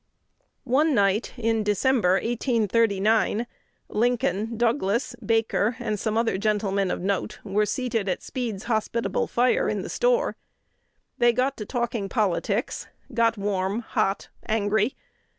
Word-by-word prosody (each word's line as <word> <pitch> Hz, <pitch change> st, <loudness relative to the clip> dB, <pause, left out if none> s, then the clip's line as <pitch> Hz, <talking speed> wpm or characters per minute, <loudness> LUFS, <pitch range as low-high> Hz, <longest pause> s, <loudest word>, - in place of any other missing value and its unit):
One 285 Hz, +4 st, +3 dB
night 200 Hz, +1 st, +2 dB
in 225 Hz, -1 st, +1 dB
December, 210 Hz, -1 st, +2 dB
1839, 225 Hz, -1 st, +1 dB, 0.4 s
Lincoln, 230 Hz, -1 st, 0 dB
Douglas, 235 Hz, 0 st, 0 dB
Baker, 225 Hz, 0 st, +1 dB
and 210 Hz, -1 st, -2 dB
some 220 Hz, +2 st, -1 dB
other 225 Hz, -4 st, +1 dB
gentlemen 200 Hz, -2 st, 0 dB
of -, -, -2 dB
note, 200 Hz, +3 st, -1 dB
were 210 Hz, +1 st, +1 dB
seated 230 Hz, -6 st, -1 dB
at 180 Hz, -, -2 dB
Speed's 225 Hz, -6 st, -4 dB
hospitable 230 Hz, 0 st, -1 dB
fire 255 Hz, -, +2 dB
in -, -, -2 dB
the -, -, -6 dB
store. -, -, +1 dB, 0.8 s
They 240 Hz, 0 st, +5 dB
got 260 Hz, +3 st, +1 dB
to 210 Hz, -, -6 dB
talking 235 Hz, -5 st, -2 dB
politics, 205 Hz, -6 st, -1 dB, 0.3 s
got 230 Hz, -1 st, +2 dB
warm, 200 Hz, +1 st, -1 dB
hot, 195 Hz, -3 st, -1 dB, 0.2 s
angry. 215 Hz, +2 st, +1 dB
220 Hz, 125 wpm, -25 LUFS, 205-240 Hz, 0.8 s, They